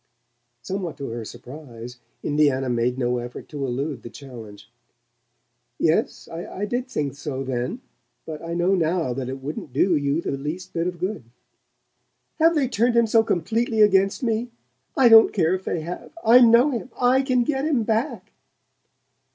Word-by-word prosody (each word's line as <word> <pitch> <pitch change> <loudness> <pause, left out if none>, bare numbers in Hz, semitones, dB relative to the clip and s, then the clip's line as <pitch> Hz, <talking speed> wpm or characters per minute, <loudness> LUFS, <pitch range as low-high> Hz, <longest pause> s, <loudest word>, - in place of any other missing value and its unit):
Somewhat 185 -2 -4
to 140 - -5
her 115 0 -5
surprise, 125 0 -10 0.2
Indiana 145 -3 +1
made 120 +1 0
no 125 -1 0
effort 120 0 -8
to 145 -2 -5
elude 135 +1 -3
the - - -9
challenge. 115 -7 -11 1.1
"Yes, 160 0 0
I 175 +4 -5
did 245 +4 -3
think 145 - -3
so 140 -2 -5
then. 130 - -3 0.4
But 155 -2 -7
I 170 0 -5
know 175 +2 +2
now 165 -6 0
that 130 0 -4
it 135 0 -7
wouldn't 145 -2 -6
do 175 +6 +3
you 145 +1 0
the - - -3
least 150 +7 -5
bit 165 +1 -1
of 180 -1 -4
good." 185 - -4 1.1
"Have 330 +1 +4
they 285 -4 +2
turned 235 0 +1
him 235 0 +5
so 225 +1 +4
completely 225 +4 +1
against 195 +2 +3
me? 230 +1 -1 0.5
I 260 - +6
don't 225 -1 +8
care 170 -3 +1
if 185 0 -3
they 165 - -2
have! 170 +3 -7
I 235 +3 +8
know 240 +4 +6
him 250 0 -4
I 255 +2 +4
can 255 -2 +1
get 270 +1 -1
him 280 -7 +1
back." 225 +6 -2
170 Hz, 165 wpm, -23 LUFS, 135-225 Hz, 1.1 s, don't